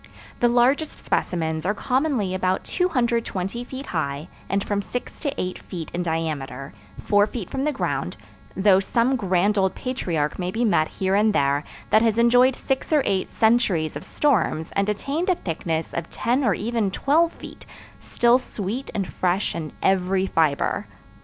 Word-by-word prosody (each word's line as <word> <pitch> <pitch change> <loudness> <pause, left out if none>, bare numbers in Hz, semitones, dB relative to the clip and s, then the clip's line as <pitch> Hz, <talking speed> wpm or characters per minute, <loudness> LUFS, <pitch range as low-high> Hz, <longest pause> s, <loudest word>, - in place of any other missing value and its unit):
The 240 - +4
largest 250 +6 +2
specimens 160 -3 -1
are 205 +4 0
commonly 255 -6 0
about 185 0 0
220 235 - -1
feet 265 +2 -7
high 145 -2 -3 0.2
and 195 +1 0
from 200 -1 -1
six 245 +5 -6
to 285 - -1
eight 185 0 -3
feet 165 -4 -7
in 175 - -1
diameter 150 -5 -3 0.3
four 205 0 +3
feet 220 -5 -6
from 270 +1 -1
the 300 - +2
ground, 265 - -2 0.4
though 190 -1 +5
some 235 +6 +1
grand 200 -1 +1
old 190 -1 +1
patriarch 170 - -2
may 180 0 -1
be 230 +6 0
met 155 -8 +3
here 190 0 -2
and 210 +2 +3
there 140 -1 +2 0.3
that 215 - +6
has 225 -1 +2
enjoyed 245 +2 +5
six 270 +3 -2
or 300 -3 +4
eight 190 -1 0
centuries 220 -9 +2
of - - -6
storms 220 - 0
and 200 +1 +1
attained 285 - -1
a 365 - +4
thickness 165 - -3
of 170 -1 -4
ten 250 +4 0
or 210 -7 +3
even 225 -1 -1
twelve 315 - +2
feet, - - -12 0.3
still 240 +1 +3
sweet 230 +1 -5
and 195 - 0
fresh 185 +2 0
in 155 -3 -5
every 190 0 +2
fiber. 155 -6 +1
200 Hz, 165 wpm, -23 LUFS, 175-245 Hz, 0.4 s, that